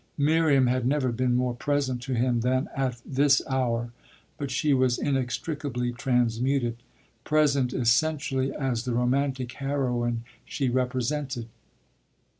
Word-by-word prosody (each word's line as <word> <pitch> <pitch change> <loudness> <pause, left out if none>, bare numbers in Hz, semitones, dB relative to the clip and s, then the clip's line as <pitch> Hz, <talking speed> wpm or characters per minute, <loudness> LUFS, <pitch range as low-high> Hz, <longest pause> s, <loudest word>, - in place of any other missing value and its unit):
Miriam 150 -2 +3
had 125 0 +1
never 135 -2 +1
been 125 +1 +1
more 125 0 +1
present 130 -1 -1
to 130 0 -3
him 120 0 +1
than 130 +3 +1
at 130 -3 -1
this 140 +1 +3
hour; 120 -3 -1 0.5
but 140 -2 -3
she 145 +2 +1
was 130 -2 +2
inextricably 135 -1 -2
transmuted 120 0 0 0.5
present 140 -4 +2
essentially 135 +3 +1
as 130 -5 -2
the 125 -2 -1
romantic 130 +1 0
heroine 125 -4 -1 0.2
she 140 -5 -2
represented. 130 0 -2
130 Hz, 120 wpm, -26 LUFS, 120-140 Hz, 0.5 s, Miriam